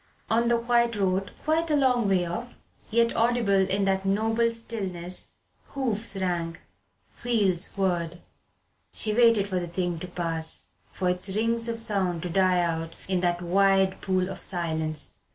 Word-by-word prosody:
On 230 +1 +3
the 235 0 +3
white 235 0 +2
road, 195 -1 0
quite 320 +2 +1
a 300 - +3
long 250 -6 +2
way 185 -2 +2
off, 230 +9 -6 0.3
yet 235 +1 +2
audible 230 -2 +2 0.2
in 195 +1 +1
that 190 0 +1
noble 225 +4 +2
stillness, 190 -6 -5 0.5
hoofs 230 -6 -1
rang, 175 -3 -2 0.7
wheels 205 -7 +2
whirred. 175 -3 -1 0.7
She 215 - +1
waited 230 -3 +4
for 185 -2 -1
the 175 - -4
thing 175 -1 -2
to 180 - -6
pass, 165 -2 -1 0.2
for 185 - -2
its 180 +2 0
rings 230 +1 +1
of 230 0 -3
sound 190 -7 -1
to 180 - -3
die 185 -1 +3
out 165 -1 -2
in 185 -1 +1
that 175 0 0
wide 195 +1 +3
pool 185 -1 0
of 190 0 -7
silence. 160 -3 -2
195 Hz, 155 wpm, -26 LUFS, 175-230 Hz, 0.7 s, waited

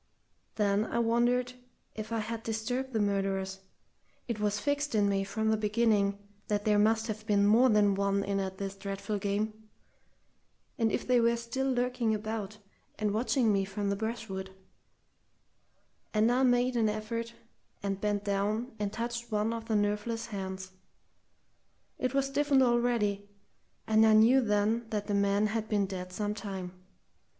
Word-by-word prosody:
Then 205 0 +2
I - - -3
wondered 240 +2 +2 0.4
if 220 0 -7
I 230 - 0
had 225 +1 -3
disturbed 235 +4 -3
the 225 - 0
murderers 195 -1 -1 0.7
it 235 -3 -3
was 210 0 0
fixed 285 0 -1
in 205 -1 +3
me 195 -1 +1
from 220 +2 -1
the 220 - +2
beginning 210 -2 +2 0.3
that 205 -1 -1
there 210 -1 +4
must 220 +1 +3
have 215 -1 -5
been 200 -2 +3
more 230 +5 +5
than 210 -2 +4
one 200 0 +1
in 200 0 -1
at 190 -1 -3
this 195 0 -4
dreadful 200 +1 -4
game 205 +2 -1 1.3
and 225 -1 +2
if - - -2
they 250 -1 +4
were 235 0 +3
still 265 +3 -2
lurking 245 -3 0
about 215 -1 -4 0.4
and 210 -2 0
watching 230 0 +2
me 195 -1 +2
from 200 +1 -2
the - - 0
brushwood; 220 -3 -4 1.7
and 220 +2 +4
I 250 +2 +2
made 250 0 +3
an 225 -2 +3
effort, 230 +2 -4 0.5
and 195 -1 -2
bent 205 -1 0
down 210 +5 -1
and 205 -1 -1
touched 235 +1 -4
one 215 +2 0
of 230 -1 -5
the 225 - -1
nerveless 210 +3 0
hands. 190 -2 -6 1.3
It 255 +1 -1
was 275 -1 +3
stiffened 275 0 +3
already, 235 -5 +1 0.6
and 220 0 +4
I 220 -1 +6
knew 230 +5 +6
then 220 +1 +1
that 210 -2 -2
the 205 - -2
man 200 +1 +2
had 220 0 -2
been 205 -2 +2
dead 185 -1 -6
some 205 +2 -2
time. 195 -4 -6
215 Hz, 160 wpm, -30 LUFS, 200-235 Hz, 1.7 s, I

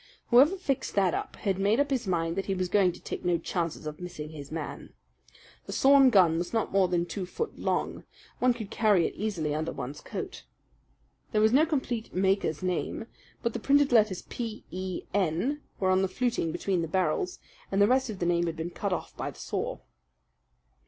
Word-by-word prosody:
Whoever 280 +10 +6
fixed 275 -7 -2
that 190 -3 +3
up - - -3
had 195 -2 -1
made 205 +5 +3
up 285 0 +1
his 255 -6 0
mind 165 -2 0
that 195 - -3
he 195 - 0
was 185 -1 -1
going 190 -2 +4
to - - -12
take - - -6
no 175 -1 +2
chances 165 -2 -3
of 150 0 -6
missing 155 -4 -6
his 145 -2 -9
man. 160 -2 -6 0.7
The - - -5
sawed 275 -1 +6
gun 180 -7 +5
was 175 +4 -4
not 225 -2 0
more 195 -1 +4
than 175 -1 0
two 185 0 -5
foot 460 - -4
long - - -1 0.4
one 250 -1 +3
could 220 -3 -7
carry 205 -6 +3
it - - -2
easily 180 -8 -2
under 155 +1 -2
one's 140 +2 -6
coat. - - -6 0.9
There 215 - +3
was 220 +2 +4
no 305 +5 +5
complete 250 - -2
maker's 190 -4 +1
name; 185 +4 -2 0.4
but 235 - 0
the - - -3
printed 285 0 +3
letters 215 -6 +3
P 225 -3 -6
E 185 0 -4
N 200 - 0 0.2
were 190 -1 +2
on 185 0 +4
the 190 - +2
fluting 230 -4 -1
between 185 +1 -1
the 165 - -2
barrels, 190 - 0 0.3
and 195 - +1
the 200 - +6
rest 260 +1 +2
of 210 - -5
the 175 - -2
name 175 0 +2
had 165 - -2
been 165 +2 -4
cut 200 +1 -3
off - - -5
by - - -3
the - - -12
saw." - - -3
195 Hz, 205 wpm, -28 LUFS, 175-235 Hz, 0.9 s, Whoever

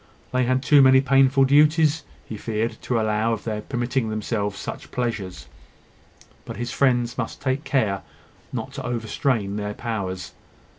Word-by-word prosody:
They 125 0 +1
had 130 +1 +1
too 145 +1 +6
many 130 0 +7
painful 135 0 +4
duties, 150 +2 +4 0.2
he 110 - -7
feared, 110 +1 -3
to 120 -2 0
allow 110 +1 +1
of 110 - -4
their 110 -2 -3
permitting 120 -1 -2
themselves 105 -2 -2
such - - -7
pleasures: 110 -8 -3 1.0
but - - -8
his 120 0 -3
friends 120 -3 +1
must - - -4
take 130 +3 -1
care 110 -11 0 0.5
not 130 +2 -5
to 140 -2 -6
overstrain 115 -3 -1
their 105 0 -4
powers. 95 -6 -4
120 Hz, 150 wpm, -23 LUFS, 110-135 Hz, 1.0 s, many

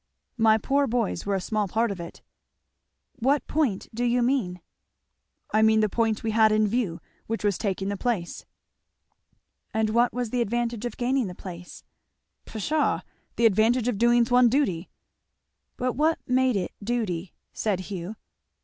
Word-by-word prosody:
My 220 -1 +5
poor 280 +5 +1
boys 230 -6 -1
were 200 - +1
a - - 0
small 210 +2 -1
part 225 +4 0
of 195 - -6
it." 170 - -9 1.0
"What 270 +4 +2
point 275 -11 0
do 235 +2 -2
you 245 0 +2
mean?" 235 -9 0 0.9
"I 215 - +3
mean 220 0 +5
the 215 - +2
point 225 0 0
we 225 - 0
had 220 0 +4
in 215 0 +3
view, 205 -6 -1 0.3
which 225 -1 -3
was 205 -2 +2
taking 195 -1 -2
the 200 - -2
place." 195 -7 -3 1.3
"And 220 -1 +1
what 235 +2 +3
was 245 -2 -3
the 250 - 0
advantage 235 0 -1
of 240 - -5
gaining 255 -1 +1
the 180 - -7
place." 175 -1 -10 0.6
"Pshaw! 295 +8 0 0.3
The 235 - +2
advantage 225 +3 +3
of 230 -5 -1
doing 240 0 +4
one's 245 -1 +6
duty." 200 - 0 0.9
"But 250 0 -1
what 315 +4 +2
made 255 -1 +2
it 185 -3 -2
duty?" 200 -7 -2 0.2
said 200 -4 -1
Hugh. 185 +2 -5
225 Hz, 160 wpm, -26 LUFS, 200-245 Hz, 1.3 s, one's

